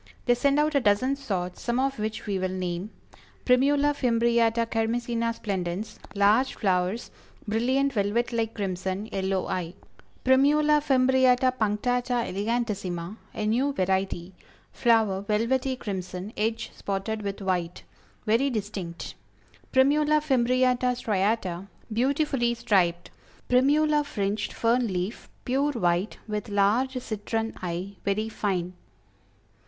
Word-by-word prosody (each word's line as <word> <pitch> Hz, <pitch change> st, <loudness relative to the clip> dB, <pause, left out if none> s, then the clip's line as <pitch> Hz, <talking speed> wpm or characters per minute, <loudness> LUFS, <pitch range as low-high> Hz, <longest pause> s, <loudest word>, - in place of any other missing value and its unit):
They 245 Hz, -, +5 dB
send 280 Hz, +4 st, +2 dB
out 305 Hz, +1 st, +2 dB
a 280 Hz, -, +4 dB
dozen 245 Hz, +4 st, +2 dB
sorts, 185 Hz, -10 st, -4 dB
some 240 Hz, +1 st, -1 dB
of 270 Hz, -2 st, 0 dB
which 215 Hz, +1 st, -3 dB
we 200 Hz, -2 st, -1 dB
will 185 Hz, 0 st, -1 dB
name: 185 Hz, +1 st, -3 dB, 0.6 s
Primula 280 Hz, +3 st, +4 dB
Fimbriata 235 Hz, -2 st, +2 dB
Kermesina 230 Hz, +1 st, -1 dB
Splendens; 200 Hz, -1 st, -4 dB, 0.2 s
Large 210 Hz, +6 st, +3 dB
flowers, 190 Hz, +2 st, 0 dB, 0.4 s
brilliant 260 Hz, +6 st, +1 dB
velvet 220 Hz, +3 st, 0 dB
like 225 Hz, -1 st, -1 dB
crimson, 190 Hz, 0 st, -3 dB
yellow 190 Hz, -1 st, -1 dB
eye. 175 Hz, -1 st, -3 dB, 0.5 s
Primula 295 Hz, +3 st, +4 dB
Frimbriata 260 Hz, -2 st, +3 dB
Punctata 245 Hz, +2 st, 0 dB
Elegantissima; 200 Hz, -3 st, -2 dB, 0.2 s
a 215 Hz, -, -2 dB
new 255 Hz, +6 st, +1 dB
variety; 190 Hz, -2 st, -1 dB, 0.4 s
flower 220 Hz, -5 st, +2 dB
velvety 230 Hz, +6 st, 0 dB
crimson, 190 Hz, -2 st, -5 dB
edge 225 Hz, +2 st, -2 dB
spotted 200 Hz, +2 st, -3 dB
with 200 Hz, 0 st, -4 dB
white; 180 Hz, -3 st, -2 dB, 0.4 s
very 235 Hz, +6 st, +3 dB
distinct. 200 Hz, -7 st, -5 dB, 0.6 s
Primula 295 Hz, +3 st, +4 dB
Fimbriata 255 Hz, -2 st, +2 dB
Striata; 195 Hz, -4 st, -1 dB, 0.3 s
beautifully 260 Hz, 0 st, +1 dB
striped. 190 Hz, -7 st, +1 dB, 0.4 s
Primula 295 Hz, +4 st, +3 dB
Fringed, 205 Hz, -5 st, -2 dB
Fern 235 Hz, +1 st, +1 dB
Leaf; 185 Hz, +2 st, -4 dB, 0.2 s
pure 275 Hz, +3 st, +1 dB
white, 180 Hz, -3 st, 0 dB
with 210 Hz, 0 st, -4 dB
large 215 Hz, +7 st, +2 dB
citron 225 Hz, 0 st, -3 dB
eye; 180 Hz, +2 st, -4 dB
very 210 Hz, +2 st, -1 dB
fine. 185 Hz, -5 st, -2 dB
225 Hz, 115 wpm, -26 LUFS, 195-255 Hz, 0.6 s, They